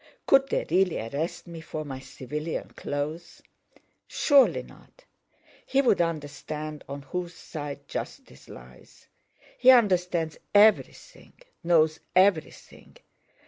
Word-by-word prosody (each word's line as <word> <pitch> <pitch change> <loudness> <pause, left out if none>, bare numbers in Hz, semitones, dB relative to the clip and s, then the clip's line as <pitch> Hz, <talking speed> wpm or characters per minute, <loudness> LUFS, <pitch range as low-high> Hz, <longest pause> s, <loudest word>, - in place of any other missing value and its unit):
could 270 0 +4
they - - -1
really 180 0 +2
arrest 140 +9 -4
me 170 -2 -9
for 155 -1 -6
my 135 -2 -7
civilian 150 +4 -6
clothes? 150 +4 -5 0.6
Surely 280 -3 +3
not! - - -19 0.6
He 270 - 0
would 245 -9 +3
understand 155 -1 -5
on 140 0 -7
whose 175 +4 -5
side 145 -3 -8
justice 65 - -8
lies. 60 +1 -15 0.5
He 255 - +5
understands 180 -9 +3 0.2
everything, 210 +1 +2 0.3
knows 160 -2 +3 0.2
everything. 185 -3 0
160 Hz, 105 wpm, -26 LUFS, 145-185 Hz, 0.6 s, He